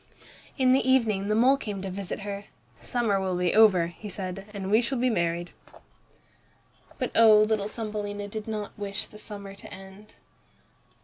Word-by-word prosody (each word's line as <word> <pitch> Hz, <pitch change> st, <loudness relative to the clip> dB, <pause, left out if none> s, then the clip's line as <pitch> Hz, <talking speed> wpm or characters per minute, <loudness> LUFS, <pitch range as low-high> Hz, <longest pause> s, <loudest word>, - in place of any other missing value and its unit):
In 255 Hz, -2 st, +4 dB
the 265 Hz, -, +4 dB
evening 220 Hz, -7 st, +2 dB
the 210 Hz, -, +1 dB
mole 255 Hz, +5 st, +5 dB
came 205 Hz, -7 st, -5 dB
to 195 Hz, -, -4 dB
visit 195 Hz, +1 st, -5 dB
her. 200 Hz, 0 st, -5 dB, 0.4 s
"Summer 220 Hz, -5 st, 0 dB
will 190 Hz, -1 st, -1 dB
soon 180 Hz, 0 st, -1 dB
be 175 Hz, -, +2 dB
over," 205 Hz, -6 st, +6 dB
he 175 Hz, +5 st, -8 dB
said, 195 Hz, 0 st, -5 dB
"and 195 Hz, -2 st, -5 dB
we 220 Hz, +2 st, +5 dB
shall 255 Hz, +3 st, -1 dB
be 250 Hz, +1 st, +2 dB
married." 170 Hz, -3 st, -1 dB, 1.5 s
But -, -, -2 dB
oh! 220 Hz, -2 st, +7 dB
little 215 Hz, -2 st, 0 dB
Thumbelina 210 Hz, -2 st, -5 dB
did 215 Hz, +1 st, -6 dB
not 210 Hz, -2 st, -4 dB
wish 200 Hz, 0 st, -3 dB
the 210 Hz, -, -14 dB
summer 200 Hz, -2 st, -9 dB
to 200 Hz, -, -13 dB
end. 195 Hz, +2 st, -13 dB
205 Hz, 175 wpm, -27 LUFS, 195-220 Hz, 1.5 s, oh